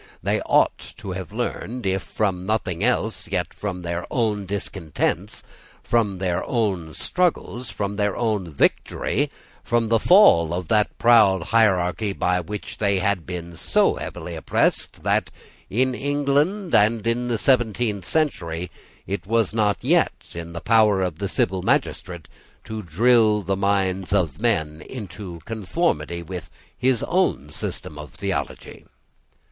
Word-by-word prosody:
They - - +1
ought - - +3 0.2
to 105 -4 -6
have 95 +2 -6
learned, 120 +1 -4
if 95 0 +1
from 95 -4 -2
nothing 100 -3 -1
else, 120 -2 0
yet - - -1
from 90 -4 -5
their 85 0 -3
own 105 -5 0
discontents, 95 -5 -3 0.4
from 105 -5 +1
their 90 -2 -1
own 95 - -1
struggles, 165 -9 -1
from 100 0 -3
their 105 -1 0
own 105 -7 -1
victory, 75 - 0 0.3
from 115 -1 +1
the 115 0 +4
fall 85 - +6
of 90 -2 -5
that 105 -1 +2
proud 110 -7 +5
hierarchy 100 -1 +2
by 90 -1 +1
which 105 +5 -6
they 100 -2 +2
had 95 -2 0
been 85 -1 -6
so - - +2
heavily - - -6
oppressed, - - 0
that, - - +1 0.4
in 130 +4 +1
England, 145 +8 0
and 110 +1 +4
in 120 +1 0
the 120 -2 0
seventeenth 110 -4 +1
century, 90 - -1 0.3
it 95 -2 -4
was 115 -2 +1
not 105 -2 +1
in 85 0 0
the 85 - -6
power 110 -4 +4
of 90 -3 -3
the 100 - -1
civil 95 -1 0
magistrate 85 -2 -1 0.4
to 110 0 -5
drill 105 +4 +3
the 95 +2 0
minds 95 -1 0
of 90 -4 0
men 80 -10 0
into 100 -7 -8
conformity 90 - -1
with 85 0 -7 0.3
his 125 -2 +1
own 80 - 0
system 75 0 -4
of 75 -4 -10
theology. - - -4
100 Hz, 140 wpm, -23 LUFS, 90-115 Hz, 0.4 s, fall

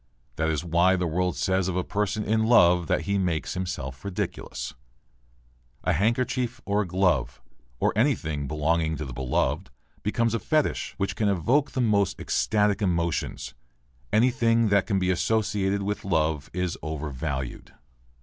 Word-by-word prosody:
That 80 0 +1
is 80 0 -1
why 85 +3 +3
the 90 -1 -1
world 90 +2 0
says 95 -1 +1
of 95 - -2
a 90 - 0
person 105 +2 -1
in 110 +1 +1
love 90 -7 +5
that - - +1
he 100 0 0
makes 85 -4 -1
himself 85 -8 -5
ridiculous. 100 -2 -4 1.1
A - - +2
handkerchief 120 +3 0
or 100 +1 +1
a 100 - -3
glove, 90 -9 +1 0.4
or - - +2
anything 80 - 0
belonging 80 +2 0
to 75 - -4
the 65 - -7
beloved, 65 0 -1 0.3
becomes 115 +2 0
a 115 - 0
fetich 155 +4 0
which 100 -1 -2
can 105 -2 +1
evoke 120 - +1
the 130 - 0
most 100 -5 +2
ecstatic 105 -2 +1
emotions. 85 -8 -1 0.6
Anything 115 0 +3
that 100 -1 +3
can 100 - +1
be 95 -1 +1
associated 100 0 0
with 105 +1 -3
love 80 -5 0
is 90 -1 -2
overvalued. 70 -4 -4
95 Hz, 150 wpm, -26 LUFS, 80-105 Hz, 1.1 s, love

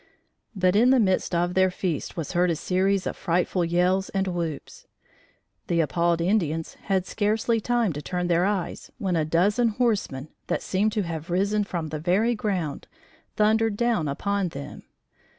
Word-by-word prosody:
But 185 -1 +2
in 235 +4 +5
the 265 -1 +5
midst 190 -4 +1
of 175 +1 +1
their 185 0 +4
feast 180 -4 -3
was 160 -4 -3
heard 175 +1 +2
a 170 - +1
series 190 +3 0
of - - -3
frightful 175 +1 0
yells 180 +3 +1
and 195 -1 -1
whoops. 170 -5 -5 0.8
The 170 - +1
appalled 170 +2 +1
Indians 165 -4 0
had 190 -2 +1
scarcely 220 +3 0
time 235 -5 +1
to 145 - -5
turn 180 +4 -3
their 175 0 +2
eyes 195 -3 -2
when 195 -7 -1
a 160 - +2
dozen 200 +9 +2
horsemen, 210 - -1 0.2
that - - -1
seemed 205 +3 +1
to 210 - 0
have 165 -1 -5
risen 200 +4 +1
from 170 -5 -4
the 155 0 -4
very 190 +9 +2
ground, 185 -10 -3 0.5
thundered 220 0 +2
down 235 -9 +1
upon 200 +7 -1
them. 140 -4 -8
185 Hz, 170 wpm, -25 LUFS, 170-210 Hz, 0.8 s, in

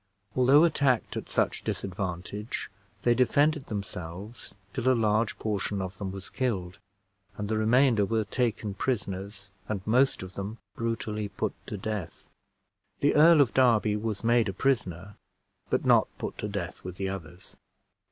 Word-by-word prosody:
Although 135 +4 +6
attacked 140 -7 +2
at - - -5
such - - 0
disadvantage, 95 +2 -4 0.3
they 120 - +5
defended 145 +4 +2
themselves 100 +1 -6 0.2
till 130 0 +1
a 130 - +3
large 110 0 +2
portion 105 -1 -2
of 95 +1 -5
them 95 -2 -3
was 95 0 -8
killed, 100 -7 -2 0.6
and 105 - -3
the 110 - 0
remainder 115 0 +4
were 110 +2 +1
taken 110 -1 -1
prisoners, 100 -3 -3 0.2
and 100 -3 -3
most 125 0 +3
of 95 0 -9
them 100 +4 -5 0.2
brutally 110 -2 -2
put - - -3
to 105 - -4
death. 105 -3 -5 0.7
The 145 - +4
Earl 155 +1 +7
of 130 - +2
Derby 115 -5 +4
was 105 -1 -3
made 115 -2 +3
a - - -3
prisoner, 95 -5 -1 0.5
but - - 0
not - - +5
put - - -4
to - - -2
death 100 -4 -5
with 90 -1 -6
the 95 +1 -2
others. 90 -1 -8
105 Hz, 150 wpm, -28 LUFS, 95-120 Hz, 0.7 s, Earl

